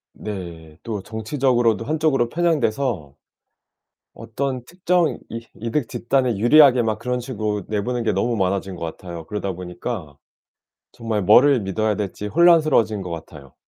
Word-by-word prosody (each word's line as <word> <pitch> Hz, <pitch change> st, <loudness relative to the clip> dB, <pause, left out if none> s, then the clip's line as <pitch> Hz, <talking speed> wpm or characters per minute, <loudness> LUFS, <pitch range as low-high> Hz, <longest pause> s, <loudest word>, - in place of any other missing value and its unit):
네. 85 Hz, -6 st, -8 dB
또 105 Hz, -4 st, -4 dB
정치적으로도 115 Hz, 0 st, 0 dB
한쪽으로 150 Hz, -6 st, +1 dB
편향돼서 130 Hz, -, -1 dB, 1.0 s
어떤 125 Hz, +3 st, -4 dB
특정 175 Hz, 0 st, 0 dB
이 115 Hz, 0 st, -7 dB
이득 115 Hz, +4 st, -2 dB
집단에 125 Hz, -2 st, 0 dB
유리하게 130 Hz, +2 st, +6 dB
막 110 Hz, -1 st, -1 dB
그런 125 Hz, +1 st, -2 dB
식으로 110 Hz, -5 st, -3 dB
내보낸 115 Hz, +3 st, -2 dB
게 110 Hz, -3 st, +1 dB
너무 115 Hz, +5 st, 0 dB
많아진 95 Hz, 0 st, -1 dB
것 85 Hz, -1 st, -5 dB
같아요. 85 Hz, 0 st, -8 dB
그러다 100 Hz, +1 st, -3 dB
보니까 90 Hz, -, -6 dB, 0.8 s
정말 115 Hz, -3 st, -3 dB
뭐를 125 Hz, +8 st, +6 dB
믿어야 105 Hz, +2 st, -1 dB
될지 105 Hz, 0 st, -4 dB
혼란스러워진 155 Hz, -, +4 dB
것 90 Hz, -, -6 dB
같아요. 75 Hz, -4 st, -10 dB
110 Hz, 325 characters per minute, -22 LUFS, 95-130 Hz, 1.0 s, 유리하게